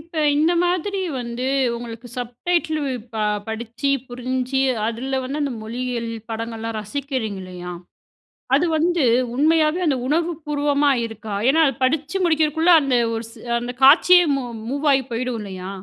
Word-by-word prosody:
இப்ப 335 +2 -18 0.2
இந்த 320 +4 +3
மாதிரி 365 +3 -1 0.2
வந்து, 240 +2 -4 0.3
உங்களுக்கு 235 0 -8
சப்டைட்டில்லு 300 +3 -1 0.2
ப - - -4 0.3
படிச்சி, 235 +5 -3 0.2
புரிஞ்சி, 255 +2 -2 0.3
அதுல 260 +4 -2
வந்து 285 +4 -3
அந்த 280 -3 -1
மொழியியல் 235 0 -3 0.2
படங்கள்லாம் 225 0 -4
ரசிக்கிறீங்கல்லையா? 205 -8 -5 0.8
அது 330 +5 +3
வந்து 340 -1 +2 0.3
உண்மையாவே 310 +3 +3
அந்த 270 -3 +2
உணவுப்பூர்வமா 295 -3 +1
இருக்கா? 220 -2 -6
ஏன்னா 320 +3 +4
அது 270 - -1
படிச்சு 300 +6 0
முடிக்கிறதுக்குள்ள, 320 +1 +3
அந்த 265 -3 +1 0.2
ஒரு 225 - -4
சி 230 - -15 0.2
அந்த 245 +1 -5
காட்சியே 355 +6 +7
மூ 270 - -2 0.3
மூவ்வாயி 280 0 +2
போயிடும் 240 0 -2
இல்லையா? 190 -2 -7
265 Hz, 130 wpm, -22 LUFS, 235-305 Hz, 0.8 s, காட்சியே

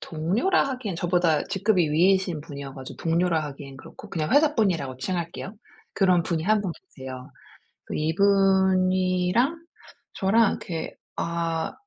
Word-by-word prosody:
동료라 185 - +1
하기에는 245 -9 -4
저보다 175 -3 +1
직급이 190 -5 +1
위이신 180 0 +2
분이어 140 -2 -8
가지고 130 -1 -9
동료라 165 0 +1
하기에는 140 -1 -9
그렇고 - - -13
그냥 155 -2 -2
회사 300 +2 +4
분이라고 165 - 0
칭할게요. 175 +6 -4 0.4
그런 180 -3 +3
분이 165 -1 -2
1 215 +2 +3
분 190 -4 -3
계세요. 130 -6 -10 0.6
그 - - -6
이분이랑 190 - +2 0.6
저랑 210 +3 +3
이렇게 165 -3 -5 0.2
아 165 -1 -2
180 Hz, 320 characters per minute, -25 LUFS, 160-195 Hz, 0.6 s, 회사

